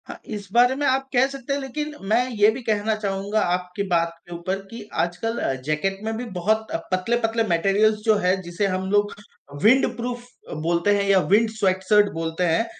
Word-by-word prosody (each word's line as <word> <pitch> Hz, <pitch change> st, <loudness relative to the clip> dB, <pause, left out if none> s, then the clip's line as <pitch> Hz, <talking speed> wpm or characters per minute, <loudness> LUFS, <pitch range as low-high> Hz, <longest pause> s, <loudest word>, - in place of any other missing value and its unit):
हाँ, -, -, -9 dB
इस 205 Hz, -2 st, -6 dB
बारे 245 Hz, +2 st, +5 dB
में 290 Hz, +1 st, -1 dB
आप 265 Hz, +1 st, +1 dB
कह 250 Hz, +1 st, +5 dB
सकते 275 Hz, 0 st, -5 dB
हैं 280 Hz, -, -1 dB
लेकिन 295 Hz, +3 st, -4 dB, 0.2 s
मैं 240 Hz, +3 st, +3 dB
ये 210 Hz, 0 st, +5 dB
भी 250 Hz, +4 st, -6 dB
कहना 215 Hz, 0 st, 0 dB
चाहूँगा 200 Hz, +1 st, -1 dB
आपकी 180 Hz, +2 st, -5 dB
बात 170 Hz, -2 st, +1 dB
के 175 Hz, -, -8 dB
ऊपर 185 Hz, +3 st, -3 dB
कि 230 Hz, 0 st, -8 dB, 0.2 s
आजकल 180 Hz, +7 st, -2 dB
अ, -, -, 0 dB
जैकेट 175 Hz, +6 st, -1 dB
में 220 Hz, 0 st, -2 dB
भी 245 Hz, -, -4 dB
बहुत 220 Hz, +5 st, +1 dB, 0.2 s
पतले-पतले 225 Hz, +4 st, 0 dB
मटेरियल्स 200 Hz, +5 st, +2 dB
जो 220 Hz, -1 st, +5 dB
है 180 Hz, +1 st, +3 dB
जिसे 175 Hz, +3 st, -2 dB
हम 190 Hz, 0 st, -2 dB
लोग 205 Hz, 0 st, +2 dB, 0.5 s
विंडप्रूफ 245 Hz, +1 st, +2 dB, 0.3 s
अ, -, -, -6 dB
बोलते 170 Hz, +6 st, +1 dB
हैं 200 Hz, -, +1 dB
या 195 Hz, -1 st, +6 dB
विंड 225 Hz, +2 st, +4 dB
स्वेटशर्ट 205 Hz, +1 st, +3 dB
बोलते 165 Hz, +1 st, -2 dB
हैं। 175 Hz, +6 st, +2 dB
205 Hz, 190 wpm, -23 LUFS, 185-230 Hz, 0.5 s, या